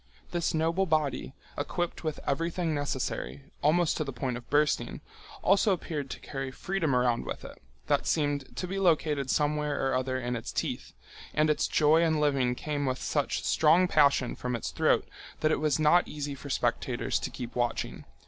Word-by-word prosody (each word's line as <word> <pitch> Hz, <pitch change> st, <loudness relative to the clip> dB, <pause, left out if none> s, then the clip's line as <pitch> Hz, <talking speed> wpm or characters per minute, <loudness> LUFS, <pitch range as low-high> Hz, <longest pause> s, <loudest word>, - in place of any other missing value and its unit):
This 170 Hz, -1 st, 0 dB
noble 165 Hz, +4 st, +1 dB
body, 150 Hz, -4 st, 0 dB, 0.2 s
equipped 175 Hz, +5 st, -3 dB
with 155 Hz, -2 st, -2 dB
everything 165 Hz, +3 st, -1 dB
necessary, 145 Hz, -1 st, -3 dB, 0.2 s
almost 160 Hz, +2 st, +3 dB
to -, -, 0 dB
the 140 Hz, -, -5 dB
point 125 Hz, 0 st, -3 dB
of 120 Hz, 0 st, -9 dB
bursting, 150 Hz, +1 st, +1 dB, 0.4 s
also 195 Hz, +1 st, +4 dB
appeared 150 Hz, -5 st, -4 dB
to -, -, -6 dB
carry 135 Hz, -1 st, -5 dB
freedom 160 Hz, 0 st, -1 dB
around 125 Hz, -1 st, +2 dB
with -, -, -6 dB
it. -, -, -11 dB, 0.2 s
That -, -, +1 dB
seem 145 Hz, -2 st, +1 dB
to 140 Hz, +6 st, -7 dB
be 195 Hz, +2 st, -3 dB
located 150 Hz, -6 st, +2 dB
somewhere 150 Hz, 0 st, +1 dB
or -, -, 0 dB
other 130 Hz, 0 st, 0 dB
in 120 Hz, 0 st, -2 dB
its 115 Hz, -, -5 dB
teeth, -, -, -3 dB, 0.4 s
and 155 Hz, 0 st, +4 dB
its 150 Hz, -, +1 dB
joy 155 Hz, +2 st, +4 dB
in 160 Hz, -2 st, +2 dB
living 135 Hz, -4 st, +2 dB
came 145 Hz, 0 st, -2 dB
with 130 Hz, 0 st, -1 dB
such -, -, -1 dB
strong 165 Hz, +4 st, +4 dB
passion 140 Hz, -6 st, +3 dB
from 125 Hz, 0 st, -3 dB
its 115 Hz, -, -4 dB
throat -, -, +2 dB, 0.3 s
that 155 Hz, -, +3 dB
it -, -, +1 dB
was 150 Hz, -2 st, +2 dB
not 155 Hz, +3 st, +4 dB
easy 145 Hz, -1 st, -4 dB
for 140 Hz, +1 st, -9 dB
spectators -, -, 0 dB
to -, -, -4 dB
keep 120 Hz, -1 st, -7 dB
watching. 120 Hz, -1 st, -2 dB
150 Hz, 180 wpm, -29 LUFS, 135-160 Hz, 0.4 s, also